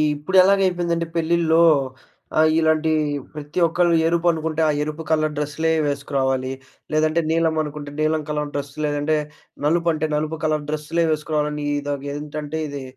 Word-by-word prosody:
ఇప్పుడెలాగయిపోయిందంటే 180 0 +2
పెళ్ళిల్లో 165 0 +3 0.8
ఆహ్, 155 0 +5
ఇలాంటి 160 0 +2 0.4
ప్రతి 150 +2 -5
ఒక్కళ్ళు 170 +1 +2
ఎరుపనుకుంట 165 -2 0
ఆ - - +4
ఎరుపు 155 +2 -4
కలర్ 155 -1 +1
డ్రస్సులే 150 +2 -1
వేసుకురావాలి. 135 -2 -1 0.4
లేదంటే 155 +2 +2
నీలం 160 0 +2
అనుకుంటే 150 -1 -6
నీలం 155 0 +1
కలర్ 150 -1 -2
డ్రస్ 140 0 -4
లేదంటే 145 +1 0 0.5
నలుపు 170 +3 +2
అంటే 155 0 -1
నలుపు 155 +1 -1
కలర్ 155 -1 0
డ్రస్సులే 155 +2 -1
వేసుకురావాలని. 150 -1 -1
ఇదొకేంటంటే 145 +2 -5
ఇది 140 -2 -6
155 Hz, 125 wpm, -22 LUFS, 150-165 Hz, 0.8 s, ఆహ్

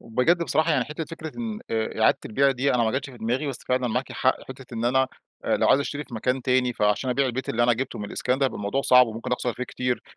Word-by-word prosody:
وبجد 125 +10 +1
بصراحة 165 0 +1
يعني 130 -4 +2
حتة 155 +2 -5
فكرة 160 -1 -8
إن 225 -2 -4
آآ 110 0 -2
إعادة 110 - +4
البيع 135 +5 +3
دي 135 +1 +1
أنا 120 - +3
ما 110 - +1
جتش 140 0 -9
في 125 - -13
دماغي 120 +6 -1
بس 135 -4 -3
فعلًا 125 -1 +1
معاكِ 125 +3 -2
حق 130 0 0
فكرة 130 0 -9
إن 115 0 -3
أنا، 130 +2 +3 0.4
آآ - - +2
لو - - +2
عايز 140 - +5
أشتري 145 +1 -4
في 125 - -11
مكان 125 +4 -1
تاني 125 -1 +2
فعشان 105 +4 +1
أبيع 135 +2 +2
البيت 130 +1 -3
اللي 120 +1 +1
أنا 120 - +4
جبته 125 +1 -3
من 105 - -4
الإسكان 125 +5 -1
ده 140 - +2
هيبقى - - -4
الموضوع 105 +7 -1
صعب 125 -2 +6
وممكن 115 +2 -5
أخسر 125 0 -1
فيه 125 - -4
كتير. 125 -1 -2
125 Hz, 265 wpm, -25 LUFS, 120-140 Hz, 0.4 s, صعب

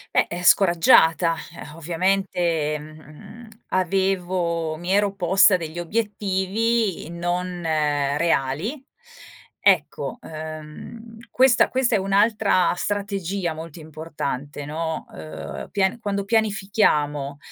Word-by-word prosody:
Beh, - - +4
eh, 175 +1 -5
scoraggiata 165 -2 +5 0.4
ovviamente, 170 -2 0
mhmm, 155 +9 -13 0.2
avevo 180 -3 0
mi 175 +3 -4
ero 205 -1 +2
posta 190 +1 +4
degli 165 -1 -7
obiettivi 205 +1 -1
non 175 +1 -3
reali. 150 - 0 0.9
Ecco, - - +1
uhm, 155 +9 -9
questa 255 -2 +4
questa 255 -3 +1
è - - +4
un'altra 200 -1 +2
strategia 195 -4 -2
molto 160 +1 -9
importante, 150 -3 -6
no, 160 +1 -4
uhm, 80 0 -8
pian 195 +3 0
quando 200 -3 -2
pianifichiamo, 195 -10 +1
175 Hz, 90 wpm, -23 LUFS, 155-200 Hz, 0.9 s, scoraggiata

